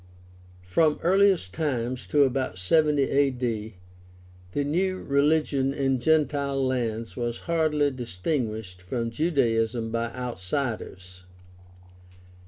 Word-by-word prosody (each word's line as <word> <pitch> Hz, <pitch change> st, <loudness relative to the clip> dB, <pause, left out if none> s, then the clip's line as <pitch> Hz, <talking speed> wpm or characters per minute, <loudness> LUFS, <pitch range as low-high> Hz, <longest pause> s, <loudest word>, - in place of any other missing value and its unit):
— 90 Hz, 0 st, -24 dB
From 150 Hz, -, +2 dB
earliest 190 Hz, -, +3 dB
times 125 Hz, -5 st, -2 dB
to 145 Hz, -1 st, +4 dB
about 130 Hz, -7 st, -1 dB
70 150 Hz, -, +3 dB
A.D. 125 Hz, -7 st, 0 dB, 0.8 s
the 145 Hz, -, 0 dB
new 185 Hz, +6 st, 0 dB
religion 140 Hz, -2 st, +1 dB
in 135 Hz, -2 st, +1 dB
gentile 140 Hz, -2 st, +1 dB
lands 115 Hz, -3 st, -2 dB
was 120 Hz, -1 st, -3 dB
hardly 155 Hz, -3 st, +1 dB
distinguished 110 Hz, -, -3 dB
from 115 Hz, +5 st, -3 dB
Judaism 115 Hz, -6 st, 0 dB
by 115 Hz, 0 st, -2 dB
outsiders. 95 Hz, -5 st, -4 dB
130 Hz, 100 wpm, -26 LUFS, 115-145 Hz, 0.8 s, to